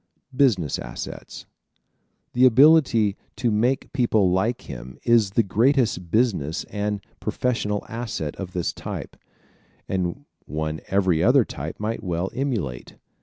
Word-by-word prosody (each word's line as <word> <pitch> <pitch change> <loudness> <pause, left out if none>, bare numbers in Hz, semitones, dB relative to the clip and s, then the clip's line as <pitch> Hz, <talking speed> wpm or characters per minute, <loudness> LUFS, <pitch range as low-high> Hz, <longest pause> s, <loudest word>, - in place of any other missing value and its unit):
Business 110 - +2
Assets - - -7 0.8
¶ - - -55
The 125 +1 +6
ability 125 -6 +5 0.2
to 120 -3 0
make 120 +5 0
people 110 -8 +2
like 110 +7 0
him 65 -1 -9
is 115 -4 +4
the 115 +4 +2
greatest 115 -3 +1
business 95 - +1
and 105 -1 -2 0.2
professional 105 -5 -1
asset 115 -10 -4
of 95 -2 -6
this 90 -2 -1
type, - - -7 0.7
and 95 +9 -2 0.2
one 75 +1 -3
every 95 -4 +2
other - - +5
type - - -7
might 110 +1 -2
well 90 0 -2
emulate. 110 - -3
105 Hz, 125 wpm, -24 LUFS, 90-120 Hz, 0.8 s, The